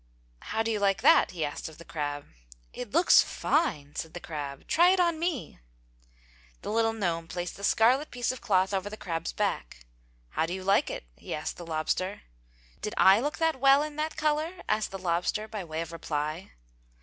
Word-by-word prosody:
"How 225 - -2
do 225 - -1
you 215 - 0
like 195 -1 +1
that?" - - +6
he 165 -4 -2
asked 145 +2 -5
of 155 - -14
the 170 - -12
crab. 145 -2 -4 0.5
"It 245 - -6
looks 335 - +6
fine!" 175 - -1
said 160 +1 -5
the - - -4
crab. 145 -5 -6
"Try 345 +3 +5
it 375 0 +3
on 340 -3 +2
me!" 330 -7 -3 1.0
The - - -3
little 225 0 +2
gnome 170 -6 -2
placed 175 0 -4
the 200 - -11
scarlet 250 +8 +3
piece 245 0 -1
of 255 - -8
cloth 190 -2 +2
over 195 +1 -1
the 215 - -8
crab's 165 -4 -3
back. 65 - -3 0.4
"How 160 - -1
do 175 - -3
you 190 - -6
like 195 +1 +3
it?" - - -5
he - - -5
asked 155 - -5
the 175 - -9
lobster. 165 +5 -2 0.6
"Did 210 - -4
I 195 +2 +7
look 290 +5 -2
that 325 -4 +1
well 275 +2 +6
in 305 -1 -6
that 310 +1 -2
color?" 310 +4 -1
asked 215 0 +1
the 195 - -6
lobster 180 +4 -1
by 210 -3 -5
way 160 -1 -4
of 165 0 -6
reply. 155 +1 -4
195 Hz, 200 wpm, -28 LUFS, 165-255 Hz, 1.0 s, I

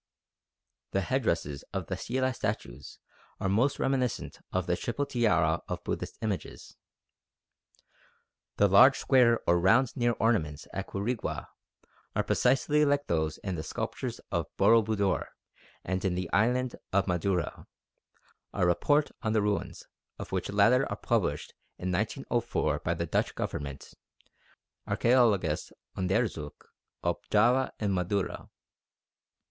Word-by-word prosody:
The 95 - +2
headdresses 85 - -1
of 95 -3 -2
the 90 - -3
stelae 130 +7 -1
statues 100 - -5 0.4
are - - -1
most 115 +9 +2
reminiscent 130 -2 -1
of - - -1
the - - +1
triple 145 - -2
tiara 85 - +2
of - - -5
Buddhist - - -4
images. 105 -4 -4 1.8
The 100 - +5
large 130 +8 +7
square 120 -4 +4
or 85 0 +3
round 115 +8 +4
ear 120 -1 +2
ornaments 80 -10 0
at 95 - -4
Quirigua 105 +4 -3 0.7
are - - +2
precisely 150 +3 +2
like 145 0 +2
those 80 -2 -1
in 95 - -2
the 80 - -3
sculptures - - -4
of - - -1
Boro 115 0 +6
Budor 100 -3 0 0.6
and 95 +1 -2
in 95 -2 0
the 90 -1 -4
island 125 +4 +2
of 100 +1 +2
Madura, 90 0 -1 0.9
a 90 - +1
report 145 - +2
on 110 -2 -1
the 110 - +3
ruins 105 -1 -2 0.3
of - - -8
which - - -2
latter 110 +6 +4
was - - -3
published - - 0 0.2
in 90 +1 -3
1904 120 +4 -1
by - - -1
the - - -2
Dutch - - -1
Government 70 -1 -5 0.9
(Archaeologisch 110 -11 +2 0.2
Onderzoek 95 -5 -2 0.4
op 85 -1 -2
Java 120 +5 +3
en 105 -2 0
Madura). 95 +2 -2
100 Hz, 130 wpm, -29 LUFS, 90-120 Hz, 1.8 s, large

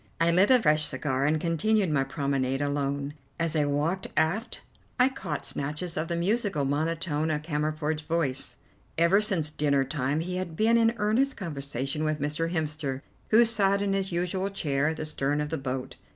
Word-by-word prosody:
I 165 +1 +4
lit 185 +4 +4
a 255 -1 +7
fresh 155 -7 +3
cigar 130 0 -1
and 155 +2 +2
continued 180 +4 +1
my 140 -3 +2
promenade 135 -1 -1
alone. 140 0 -1 0.2
As 165 -1 -1
I 150 -2 +3
walked 150 +6 0
aft 170 +9 0 0.4
I 250 +1 +6
caught 160 - -5
snatches 150 +5 -4
of 155 +1 -2
the 170 - -2
musical 190 - 0
monotone 155 +2 -1
of 150 -1 -1
Cammerford's 155 0 -1
voice. 150 -4 -1 0.4
Ever 170 +5 +4
since 180 -8 0
dinner 140 -2 +2
time 140 +2 -1
he 180 +2 -3
had 180 -3 -4
been 225 +5 +3
in 230 0 +3
earnest 225 +7 +1
conversation 140 - -3
with 155 -1 0
Mr. 150 +3 -1
Hemster, 150 -5 -2 0.3
who 230 +2 +6
sat 200 -3 +2
in 200 -1 0
his 195 -1 -1
usual 180 +3 -1
chair 150 -7 0
at 160 0 -1
the 155 - -3
stern 145 -1 -1
of 150 0 -2
the 160 - -2
boat. 130 -1 -4
155 Hz, 180 wpm, -27 LUFS, 145-185 Hz, 0.4 s, a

